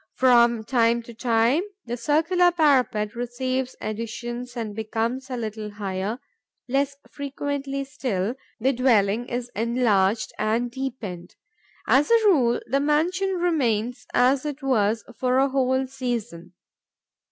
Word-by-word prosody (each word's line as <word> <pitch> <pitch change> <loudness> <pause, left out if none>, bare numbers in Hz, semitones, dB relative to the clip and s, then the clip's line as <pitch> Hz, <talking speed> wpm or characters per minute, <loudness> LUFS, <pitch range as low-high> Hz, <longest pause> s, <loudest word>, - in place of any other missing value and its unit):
From 235 -3 +4
time 235 0 +2
to 235 - -11
time, 235 +5 +2 0.2
the 240 - -3
circular 325 +8 +3
parapet 255 -10 +2
receives 255 +2 -3
additions 235 +3 -5
and 215 -3 -4
becomes 230 +4 -2
a 255 - -3
little 215 -2 -5
higher; 200 +2 -3 0.5
less 275 +2 0 0.2
frequently 280 -1 -3
still, 245 -7 -2 0.3
the 265 +4 +2
dwelling 235 -2 +2
is 245 -1 -4
enlarged 225 -3 +1
and 230 +3 0
deepened. 235 -10 -6 0.5
As 280 +3 +4
a 460 -1 +4
rule, 255 -11 +4
the 275 +4 +1
mansion 345 +7 +1
remains 245 -9 0
as 260 +2 +3
it 295 -1 -5
was 220 -4 +1 0.2
for 255 0 +2
a 270 +1 +3
whole 260 0 +1
season. 240 -10 -5
245 Hz, 125 wpm, -24 LUFS, 225-270 Hz, 0.5 s, From